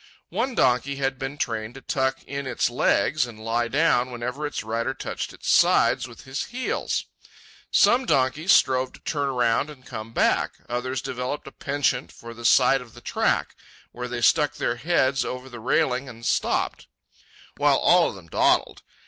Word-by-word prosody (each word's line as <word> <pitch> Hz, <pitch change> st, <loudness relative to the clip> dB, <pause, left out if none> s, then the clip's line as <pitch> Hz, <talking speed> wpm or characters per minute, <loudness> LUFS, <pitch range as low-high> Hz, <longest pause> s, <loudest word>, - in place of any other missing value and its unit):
One 260 Hz, -2 st, -2 dB
donkey 130 Hz, -, +2 dB
had 135 Hz, -1 st, -2 dB
been 135 Hz, +1 st, -5 dB
trained 115 Hz, -2 st, -3 dB
to 135 Hz, -, -10 dB
tuck 130 Hz, +1 st, -1 dB
in 140 Hz, 0 st, -5 dB
its 125 Hz, -, 0 dB
legs 130 Hz, +2 st, +2 dB
and 110 Hz, -2 st, -11 dB
lie 120 Hz, +1 st, 0 dB
down 130 Hz, -2 st, +2 dB
whenever 125 Hz, +5 st, -4 dB
its 145 Hz, -, -5 dB
rider 115 Hz, +4 st, -2 dB
touched -, -, -5 dB
its -, -, -11 dB
sides -, -, +4 dB
with -, -, -13 dB
his 130 Hz, +1 st, -4 dB
heels. 255 Hz, +1 st, -2 dB, 0.6 s
Some 250 Hz, +1 st, +4 dB
donkeys 140 Hz, +7 st, +2 dB
strove 130 Hz, -1 st, +3 dB
to -, -, -14 dB
turn 145 Hz, -3 st, -1 dB
around 125 Hz, +2 st, +1 dB
and 135 Hz, -4 st, -13 dB
come 110 Hz, -2 st, -7 dB
back; -, -, +1 dB
others 125 Hz, +1 st, -3 dB
developed 125 Hz, +4 st, -4 dB
a 135 Hz, -, -9 dB
penchant 140 Hz, -3 st, -1 dB
for 115 Hz, 0 st, -11 dB
the 120 Hz, 0 st, -10 dB
side 135 Hz, +2 st, +5 dB
of 120 Hz, -3 st, -14 dB
the -, -, -12 dB
track, -, -, 0 dB, 0.4 s
where 125 Hz, +1 st, -6 dB
they 120 Hz, -1 st, -4 dB
stuck 150 Hz, +4 st, +3 dB
their 120 Hz, -, -1 dB
heads 135 Hz, -2 st, +1 dB
over 125 Hz, +1 st, -5 dB
the 120 Hz, -2 st, -9 dB
railing 125 Hz, +3 st, 0 dB
and 115 Hz, -1 st, -11 dB
stopped; -, -, 0 dB, 0.7 s
while -, -, +4 dB
all -, -, +4 dB
of -, -, -8 dB
them 95 Hz, -3 st, -13 dB
dawdled. -, -, +1 dB
130 Hz, 175 wpm, -24 LUFS, 120-140 Hz, 0.7 s, side